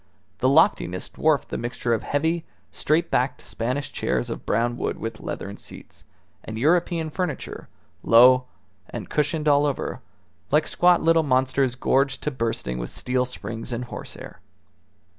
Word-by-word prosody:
The 130 - +3
loftiness 110 - +2
dwarfed 155 -2 +1
the - - -3
mixture 120 0 -2
of 110 - 0
heavy, 160 +7 0 0.3
straight 155 +3 0
backed 130 +3 +1
Spanish 130 +5 -3
chairs 120 - -1
of - - -7
brown 120 +1 +1
wood - - -2
with 115 -1 -5
leathern 100 +1 -6
seats, - - -11 0.4
and 110 - -6
European 165 +3 +1
furniture, 160 -5 -4 0.3
low, 125 +2 +6 0.4
and - - -7
cushioned 150 +1 0
all 145 0 +5
over, 140 - -3 0.5
like 150 +2 +3
squat 175 0 +3
little 165 0 +5
monsters 130 -2 +1
gorged 135 +2 +1
to 150 - -1
bursting 115 - -2
with - - -4
steel 125 0 -1
springs 115 -1 -6
and 120 +1 -3
horsehair. - - -9
130 Hz, 145 wpm, -24 LUFS, 120-150 Hz, 0.5 s, low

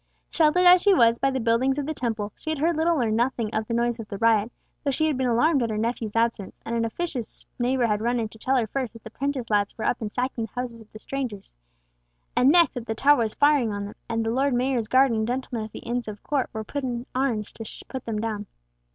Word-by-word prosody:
Sheltered 330 +3 +3
as 360 0 +8
she 400 -1 +5
was 230 -5 +4
by 275 - +2
the 265 -1 -1
buildings 240 +4 +2
of 290 - -1
the 315 - -2
Temple, 225 -6 -3
she 315 - -7
had 315 - -1
heard 325 +4 +1
little 325 0 +2
or 230 -3 +1
nothing 230 -1 0
of 220 0 -1
the 230 - -3
noise 235 0 0
of 225 - -7
the 200 - -6
riot, 225 0 +3 0.3
though 285 - 0
she 315 +3 +1
had 310 -2 +1
been 255 0 0
alarmed 270 +5 +3
at 235 - 0
her 215 - -2
nephew's 225 -1 -2
absence, 230 -4 -1
and 230 - -2
an 230 0 +1
officious 250 -1 -4
neighbour 245 0 +2
had 210 -2 0
run 240 +2 +1
in 225 - -1
to 220 - -16
tell 265 +4 +1
her 245 -3 +2
first 250 +1 -3
that 230 - -13
the 220 - -10
prentice 270 -2 -3
lads 205 -1 +1
were 220 - -3
up 245 - 0
and 210 -2 -3
sacking 250 -1 -2
the 235 +3 -8
houses 235 -2 -5
of 220 - -18
the - - -10
strangers, 235 -4 -5 0.8
and 255 - +5
next 335 -2 +5
that 245 -3 -6
the 220 - -2
Tower 285 +4 +4
was 220 -2 -1
firing 285 -6 +3
on 205 0 -4
them, 205 - -9
and 225 -1 -1
the 225 - 0
Lord 265 +2 +1
Mayor's 245 -2 0
guard 260 +2 +4
and 220 -1 0
the 220 +2 -1
gentlemen 250 -3 -3
of 215 - -11
the - - -10
Inns 240 0 -2
of 210 -1 -8
Court 280 -3 -1
were 220 - -4
up 215 - -13
in 250 -3 -3
arms 245 -5 -1
to 225 -2 -10
put 260 -2 -6
them 225 -2 -2
down. 210 -2 -3
235 Hz, 270 wpm, -25 LUFS, 220-270 Hz, 0.8 s, as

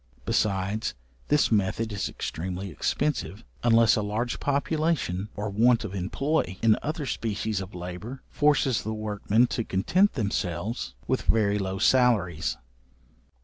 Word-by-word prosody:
Besides, 100 +1 0 0.3
this 150 -4 +3
method 110 +1 +1
is 100 - -2
extremely 95 +3 -5
expensive, 115 - -2 0.2
unless 115 -2 +5
a 105 - 0
large 110 +4 -2
population, 140 - 0
or 105 +1 -3
want 115 +4 +4
of 105 -3 -6
employ 100 - -1
in 110 -1 +6
other 155 0 -3
species 110 -4 -2
of 95 0 -8
labour, 90 +9 -7
forces 145 -4 +2
the 110 0 -4
workmen 110 +2 +1
to 115 - 0
content 180 - +2
themselves 100 - -2
with 130 - 0
very 105 -2 +2
low 95 -1 -2
salaries. 100 -8 +2
110 Hz, 130 wpm, -27 LUFS, 95-125 Hz, 0.3 s, in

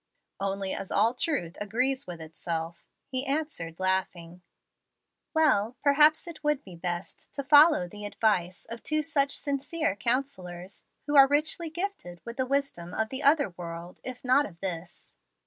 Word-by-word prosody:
"Only 195 -1 -2
as 195 - -5
all 220 +4 +3
truth 250 - -2
agrees 250 +6 0
with 175 -2 -7
itself," 165 +1 -5 0.2
he 260 -1 -2
answered, 275 - -2
laughing. 185 -2 -1 0.9
"Well, 250 -8 +3
perhaps 300 +2 +5
it 335 -3 -9
would 300 -2 +1
be 185 -3 -11
best 175 +1 -5
to 280 - -3
follow 295 - +6
the 210 +3 -9
advice 185 -4 0
of 230 0 -8
two 310 0 0
such 285 -3 +1
sincere 280 - -1
counsellors, 200 -7 -3 0.2
who 290 - -1
are 275 -1 +9
richly 305 +4 +2
gifted 335 - -4
with 235 0 -7
the 260 -1 0
wisdom 275 -11 -2
of 220 0 0
the 265 +1 -4
other 285 - +4
world, 170 0 -8
if 255 -1 -7
not 260 +3 +4
of 170 -4 -16
this. 175 -2 -6
230 Hz, 155 wpm, -28 LUFS, 180-285 Hz, 0.9 s, are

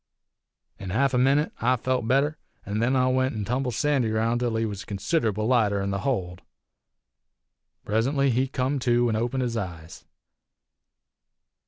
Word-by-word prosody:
In 95 - -6
half 135 +7 +1
a - - +2
minit 140 +4 +3
I 125 +3 +3
felt 125 -1 -1
better, 140 +5 +1 0.3
an' 100 +2 -2
then 125 +4 +2
I 130 -1 +3
went 130 -1 +1
an' 105 -2 -3
tumbled 125 +1 -1
Sandy 140 -5 +1
roun' 115 +2 0
till 120 -2 -1
he 115 0 0
was 100 -2 -5
considerable 110 - -1
lighter 110 -5 +2
in 100 0 -2
the 100 - -2
hold. 95 -10 -2 1.4
Presently 135 +6 +1
he 130 +3 +1
come 135 +1 -1
to 120 -1 +2
an' 110 - 0
opened 120 +4 -1
his 120 -2 -2
eyes. 85 -7 -6
120 Hz, 160 wpm, -25 LUFS, 110-130 Hz, 1.4 s, minit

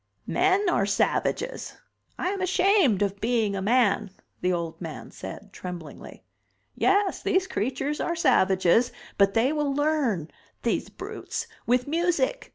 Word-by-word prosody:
"Men 380 +2 +2
are 195 - +2
savages. 475 - -1 0.4
I 360 - -1
am 390 0 -3
ashamed 370 - +3
of 200 0 -3
being 225 -3 +1
a 195 - -2
man," 215 -1 +2 0.3
the 180 - +1
old 170 -1 -3
man 165 -3 -7
said, 200 -1 -9
tremblingly. 175 -4 -8 0.5
"Yes, 395 0 +2
these 375 0 +2
creatures 270 - -2
are 340 - -1
savages, 225 - +3 0.3
but 195 0 +4
they 245 +6 +3
will 295 -2 0
learn 275 - 0 0.3
these - - 0
brutes - - -6 0.2
with 250 +2 +2
music. 350 +11 0
250 Hz, 135 wpm, -26 LUFS, -, 0.5 s, but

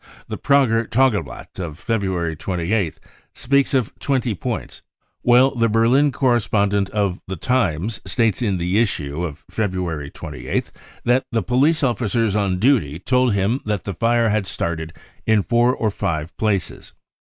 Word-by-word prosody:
The - - -4
Prager 125 -5 +3
Tageblatt 110 - 0
of 85 -4 -5
February 95 -7 -1
28th 90 +1 -1 0.4
speaks 140 +1 +1
of 125 -5 0
20 130 -4 0
points, 90 - -5 0.4
while 125 +3 +5
the 115 -3 +1
Berlin 120 +7 +3
correspondent 105 -6 +1
of 100 -4 -1
The 95 - -4
Times 105 -1 -1
states 105 +4 +1
in 100 -6 +1
the 90 +4 +1
issue 85 -8 -1
of 80 -5 -6
February 90 -8 -2
28th - - -4 0.3
that 125 +2 +3
the 115 -2 0
police 145 +6 +2
officer 120 -3 +1
on 100 -3 +1
duty 95 - +2
told 125 +3 +1
him 100 +7 0
that 105 -2 -2
the 100 - -4
fire 115 +4 +2
had 105 -2 0
started 80 -2 -3 0.4
in 110 -2 +4
4 120 +3 +2
or 110 -2 0
5 80 -3 -3
places. 105 -4 -2
110 Hz, 145 wpm, -21 LUFS, 90-120 Hz, 0.4 s, while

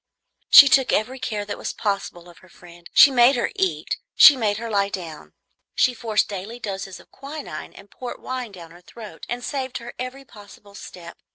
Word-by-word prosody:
She 280 - +10
took 265 -1 +3
every 250 +5 -1
care 210 -4 -4
that 205 - -7
was - - -5
possible 195 -4 -4
of 175 0 -17
her 185 - -21
friend. 175 0 -16
She 285 - +7
made 250 +1 +4
her 240 - -2
eat; 380 -2 -2 0.2
she 290 - +9
made 210 -5 -1
her 230 +1 -6
lie 200 -2 0
down. 170 -6 -9 0.4
She 255 - +2
forced 225 -3 -1
daily 205 +4 -7
doses 195 -3 -6
of - - -20
quinine 275 - -9
and 195 +1 -16
port 250 -1 -8
wine 255 -3 -6
down 170 -4 -13
her 175 +1 -16
throat, 210 -2 -12
and 245 0 -5
saved 260 -2 -4
her 235 +1 -10
every 255 +2 -7
possible 205 -2 -16
step. 170 -3 -12
215 Hz, 195 wpm, -22 LUFS, 190-255 Hz, 0.4 s, She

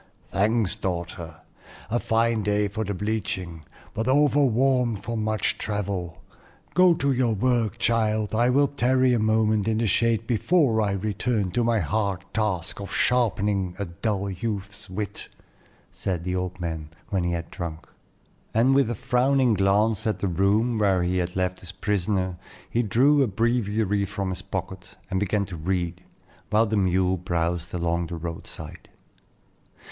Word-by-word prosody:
"Thanks, 105 0 +1
daughter! 85 -2 -5 0.5
A 120 - +2
fine 115 -1 +1
day 105 0 +1
for 105 +3 -3
the 100 -1 -3
bleaching, 95 -6 -3 0.3
but 110 +2 -2
over 145 +2 +4
warm 125 -2 +3
for 115 +4 -5
much 110 -2 -1
travel. 95 -5 -3 0.5
Go 180 -1 +6
to 140 -2 +1
your 125 -4 +1
work, 120 0 +1
child; 110 -2 +1
I 120 +3 +3
will 140 +3 +4
tarry 130 -1 +2
a 120 - +2
moment 110 -1 +2
in 110 -1 +1
the 115 - +1
shade 115 +2 +2
before 120 0 +2
I 100 -2 +1
return 105 0 -1
to 120 - +1
my 115 -2 +2
hard 100 +3 -1
task 100 -7 -1
of 100 0 -6
sharpening 105 -7 +1
a 100 - -2
dull 100 +3 -2
youth's 100 +1 -5
wit," 100 +1 -5 0.6
said 90 -3 -3
the 90 +1 -2
old 90 0 -3
man 80 -3 -4 0.2
when 95 -4 0
he 85 0 0
had 85 -1 -4
drunk; 80 -2 -6 0.7
and 120 +4 +4
with 135 -4 +3
a 120 - -1
frowning 125 +2 +2
glance 105 +2 +2
at 110 - 0
the 100 - -1
room 105 +6 +2
where 95 -4 +3
he 90 +1 0
had 90 -1 -2
left 90 0 -1
his 90 - -9
prisoner, 95 -2 -1 0.3
he 120 - 0
drew 135 +6 +4
a 135 - +3
breviary 105 -2 0
from 100 -1 -3
his 95 0 -4
pocket 95 -1 -6 0.2
and 95 - +1
began 100 0 0
to 95 - -8
read, 90 +1 -2 0.5
while 110 +2 +4
the 110 0 -1
mule 95 -1 +2
browsed 85 -1 -2
along 85 -1 -1
the 85 - -5
road 85 0 -6
side. - - -10
105 Hz, 160 wpm, -25 LUFS, 90-115 Hz, 0.7 s, Go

